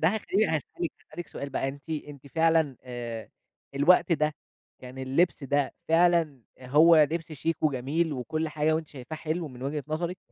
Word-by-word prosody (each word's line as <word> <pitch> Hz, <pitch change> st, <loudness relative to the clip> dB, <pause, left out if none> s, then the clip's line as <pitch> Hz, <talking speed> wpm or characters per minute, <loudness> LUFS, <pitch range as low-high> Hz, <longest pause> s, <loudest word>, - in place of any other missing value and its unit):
ده 160 Hz, -, +6 dB
هيخليني 215 Hz, +1 st, +1 dB
هاسألِك 160 Hz, +2 st, -3 dB, 0.2 s
هاسألِك 175 Hz, -, -7 dB
سؤال 140 Hz, -, -6 dB
بقى 135 Hz, 0 st, -1 dB
أنتِ 140 Hz, +3 st, -9 dB
أنتِ 145 Hz, -3 st, -6 dB
فعلًا 160 Hz, -2 st, +2 dB
آآ 120 Hz, -3 st, -6 dB, 0.5 s
الوقت 170 Hz, +5 st, +5 dB
ده 150 Hz, -1 st, +1 dB, 0.5 s
يعني 130 Hz, +1 st, -8 dB
اللبس 140 Hz, +4 st, +1 dB
ده 140 Hz, 0 st, 0 dB
فعلًا 165 Hz, -5 st, +3 dB, 0.2 s
هو 155 Hz, +6 st, +6 dB
لبس 165 Hz, -1 st, -4 dB
شيك 160 Hz, +3 st, -2 dB
وجميل، 150 Hz, +3 st, 0 dB
وكل 155 Hz, +5 st, -2 dB
حاجة، 155 Hz, +1 st, +1 dB
وأنتِ 160 Hz, -1 st, -3 dB
شايفاه 140 Hz, +3 st, -8 dB
حلو 155 Hz, +1 st, -3 dB
من 125 Hz, -1 st, -11 dB
وجهة 145 Hz, +1 st, -3 dB
نظرِك، 170 Hz, +4 st, -2 dB
155 Hz, 165 wpm, -28 LUFS, 135-165 Hz, 0.5 s, ده